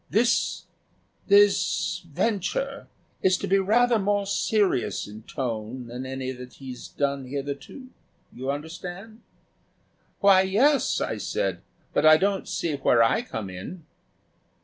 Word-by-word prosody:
This 230 +3 +1 0.6
this 205 0 +3
venture 230 - -1 0.3
is 185 -1 +3
to - - -4
be 195 +1 +3
rather 230 +4 +3
more 205 0 +1
serious 200 - 0
in 105 +1 -10
tone 120 0 -4
than 125 +2 -6
any 130 0 -4
that 125 -1 -10
he's 130 -2 -9
done 140 -2 -2
hitherto. 140 - -6 0.4
You 130 +2 -5
understand?" 175 +9 -6 1.0
"Why, 195 -1 +6
yes," 245 +10 +2
I - - -2
said; - - -2 0.3
"but - - +2
I 155 0 +8
don't 195 +3 0
see 165 -3 -2
where 120 -4 +4
I 115 - +2
come 105 -4 -6
in." 150 - -8
170 Hz, 125 wpm, -25 LUFS, 130-205 Hz, 1.0 s, I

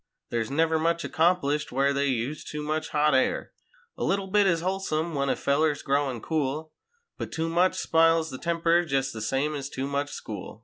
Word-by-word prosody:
There's 115 -2 -1
never 160 +3 +2
much 170 +1 +1
accomplished 160 -3 +1
where 140 +2 +2
they 140 0 +1
use 130 +3 -2
too 150 0 -5
much 155 +1 -2
hot 150 0 +2
air. 130 - +1 0.5
A - - -1
little 195 0 +1
bit 200 +1 +3
is 170 -3 +2
wholesome 170 -3 -1
when 140 -1 0
a - - +2
feller's 145 +1 +1
growin' 140 -4 0
cool 155 +2 -2 0.5
But - - -5
too 160 0 -2
much 180 +3 +2
spiles 165 -2 +3
the 130 - -7
temper 170 0 +2
jest 135 -4 -1
the 110 - -6
same 135 +7 0
ez 140 -2 -4
too 135 -1 -4
much 140 +1 -2
school. 105 0 -7
150 Hz, 190 wpm, -27 LUFS, 140-165 Hz, 0.5 s, bit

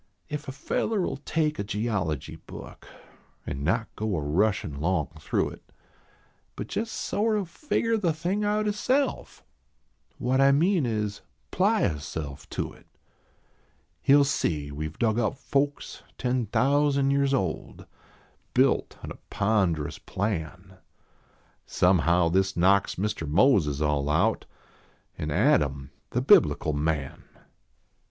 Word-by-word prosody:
If 150 0 -5
a - - -3
feller 185 +9 -1
11 135 - -3
take 155 -2 0
a - - 0
geology 100 - -2
book - - -11 0.6
An 70 +1 -4
not 110 +8 +1
go 110 -2 -2
a - - 0
rushin 75 -1 0
long 85 -4 0
through 75 - 0
it, - - -15 0.8
But 105 - -6
jes 225 +1 -1
sort 215 0 0
o 200 - -1
figger 230 - -1
the 175 -5 +1
thing 175 +7 -2
out 210 +1 +1
hisself 255 +7 -1 0.7
What 130 +2 +1
I 135 0 +6
mean 165 -1 +2
is: 105 -3 -2 0.3
ply 205 +2 +2
hisself 75 -2 -6
to - - -4
it - - -20 1.1
He 140 - +5
ll 145 - +6
see 75 - -1
we 75 +2 -4
ve 75 - -11
dug 110 -1 +1
up 120 +3 0
folks 140 +1 -2 0.2
ten 125 -2 -1
thousand 140 +3 +2
years 140 0 +2
old, 95 -12 -2 0.7
Built - - +2
on - - -6
a - - -10
ponderous 95 -8 0
plan; 95 -1 -4 0.9
Somehow 90 -1 +3
this 95 +2 +1
knocks 95 +3 +3
Mr. 100 -5 -2
Moses 80 - +3
all 75 -1 0
out 75 - +1 0.7
An 75 - -3
Adam, 75 - +1 0.2
the - - -1
biblical 75 - +4
man. 75 -2 -2
105 Hz, 130 wpm, -26 LUFS, -, 1.1 s, I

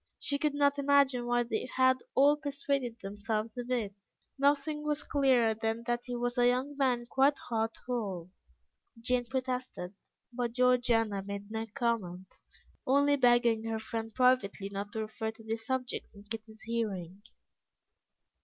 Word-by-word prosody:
She 285 0 -1
could 300 -1 0
not 285 0 +3
imagine 275 -3 +3
why 240 0 +2
they 235 0 -2
had 260 0 +5 0.2
all 285 +2 +6
persuaded 280 -4 -2
themselves 215 +2 -3
of 245 0 -5
it. 230 -6 -1 0.4
Nothing 290 +2 +1
was 300 0 -1
clearer 260 -6 +3
than 225 +1 -2
that 240 0 -1
he 245 -1 -4
was 245 +1 -1
a 245 - +5
young 255 +4 0
man 255 -4 +1
quite 270 +3 +3
heart 225 -1 -2
whole. 195 -8 -3 0.7
Jane 245 +1 0
protested, 255 -7 -3 0.4
but 240 -1 -2
Georgiana 240 -4 +3
made 200 +1 -7
no 225 0 -3
comment, 190 -6 -2 0.5
only 285 +2 +4
begging 240 -4 +3
her 225 0 -1
friend 225 0 -4
privately 250 -6 +2
not 200 +1 -5
to 220 - -2
refer 220 +1 -4
to 225 0 -15
the 220 0 -2
subject 250 +2 -3
in 200 - -13
Kitty's 220 0 -6
hearing. 200 -5 -3
240 Hz, 150 wpm, -31 LUFS, 220-260 Hz, 0.7 s, all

